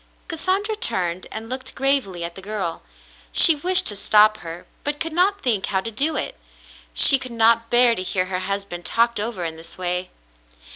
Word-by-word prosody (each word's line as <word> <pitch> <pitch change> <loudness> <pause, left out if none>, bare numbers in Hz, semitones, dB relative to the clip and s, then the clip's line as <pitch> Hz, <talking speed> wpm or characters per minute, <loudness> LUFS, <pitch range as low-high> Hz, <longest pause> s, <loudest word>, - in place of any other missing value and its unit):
^^" - - -36
Cassandra 380 +6 -2
turned 185 - -1
and 220 +1 -8
looked 260 +2 -6
gravely 270 -10 -1
at 170 0 -6
the 190 - -10
girl. 195 -4 -5 0.5
She 330 - +6
wished 360 +5 +3
to 205 - +1
stop 215 +1 +3
her, 170 -2 -10 0.2
but 290 0 -3
could 325 0 -3
not 390 +4 +1
think 220 -6 0
hov/ 190 -1 -2
to 230 - -6
do 295 +8 -1
it. - - -4 0.5
She 275 - +6
could 255 - -8
not 230 0 +3
bear 240 0 +6
to 185 - -3
hear 185 0 -2
her 185 -1 -4
husband 195 -2 -5
talked 235 +2 0
over 210 -5 -4
in 160 -1 -6
this 165 +1 -11
way. 180 0 -3
220 Hz, 195 wpm, -21 LUFS, 185-270 Hz, 0.5 s, She